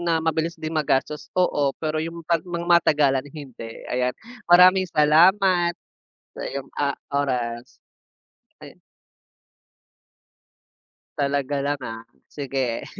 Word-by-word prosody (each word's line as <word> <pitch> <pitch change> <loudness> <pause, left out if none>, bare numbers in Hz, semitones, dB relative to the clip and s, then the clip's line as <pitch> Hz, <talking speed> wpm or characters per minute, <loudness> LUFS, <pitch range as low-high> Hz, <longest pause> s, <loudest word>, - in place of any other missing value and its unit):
na 165 -2 0
mabilis 160 +1 -1
din 155 0 -6
magastos 150 -1 -1
oo, 150 -6 +2
pero 155 0 -2
yung 165 +1 -6
'pag 170 -1 +1
mga 170 -1 -5
matagalan 145 -5 +3
hindi. 130 -6 -10
Ayan, 125 0 -1 0.3
maraming 185 +1 +6
salamat 175 +3 +4 0.6
sa - - -6
iyong, 135 -1 -6
ah, 140 -1 0 0.2
oras. 125 -4 -3 0.8
Ay - - -13 2.4
Talaga 140 0 -1
lang 145 0 -1
ah, 115 -2 -7 0.2
sige. 135 -4 -3
150 Hz, 105 wpm, -23 LUFS, 135-170 Hz, 2.4 s, maraming